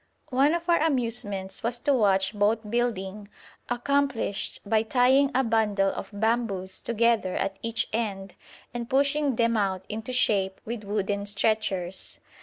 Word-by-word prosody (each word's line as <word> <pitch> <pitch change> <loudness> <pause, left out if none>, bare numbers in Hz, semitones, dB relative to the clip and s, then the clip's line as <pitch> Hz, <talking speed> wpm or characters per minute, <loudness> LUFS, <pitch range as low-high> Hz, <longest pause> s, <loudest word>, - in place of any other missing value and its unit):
One 275 +5 +3
of 340 0 -4
our 340 -1 +4
amusements 230 -10 -1
was 240 +1 -1
to 285 - +2
watch 195 -5 +2
boat 210 +1 0
building 210 -4 -2 0.4
accomplished 260 -3 -1
by 215 +1 +2
tying 255 +4 +3
a 265 - +3
bundle 215 -4 +2
of - - -6
bamboos 205 -3 -1
together 230 -4 +1
at 195 0 -2
each 230 0 -1
end 195 -4 -3 0.4
and 240 -1 -5
pushing 280 0 +2
them 230 0 +2
out 190 -3 -1
into 220 +3 -5
shape 195 -6 +1
with 225 -2 -5
wooden 200 0 -2
stretchers. 200 -3 -1
220 Hz, 140 wpm, -26 LUFS, 200-245 Hz, 0.4 s, our